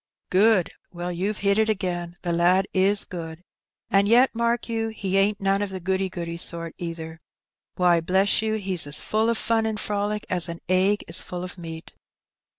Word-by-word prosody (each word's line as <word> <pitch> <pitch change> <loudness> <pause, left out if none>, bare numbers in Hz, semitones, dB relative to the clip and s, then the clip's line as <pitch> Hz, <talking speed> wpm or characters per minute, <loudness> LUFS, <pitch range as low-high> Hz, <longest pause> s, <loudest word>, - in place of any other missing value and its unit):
'^ - - -59
Good! 195 -1 +4 0.2
Well, 175 0 -4
you've 195 +5 -2
hit 200 +1 +3
it 220 0 +2
again, 175 -4 -2
the 175 -1 -1
lad 180 +3 +3
is 195 +2 +3
good; 165 -2 -7 0.5
and 200 0 +4
yet, 245 +4 +5
mark 235 +1 0
you, 225 -1 -1
he 200 -4 -3
ain't 200 +1 +3
none 195 0 +1
of 205 - -1
the 190 0 -5
goody 190 +1 -1
goody 170 -2 -5
sort 170 -1 -3
either. 165 -1 -6 0.5
Why, 175 -2 +3
bless 190 +5 +2
you, 220 0 -1
he's 190 -7 -1
as 145 +1 0
full 220 +1 0
of 230 - +1
fun 225 -1 +1
and 215 -1 -2
frolic 210 0 -2
as 175 -2 -1
an 170 0 -6
egg 190 +3 +2
is 165 +2 -1
full 180 0 -6
of 180 - -7
meat. 165 -2 -9
190 Hz, 195 wpm, -24 LUFS, 175-210 Hz, 0.5 s, yet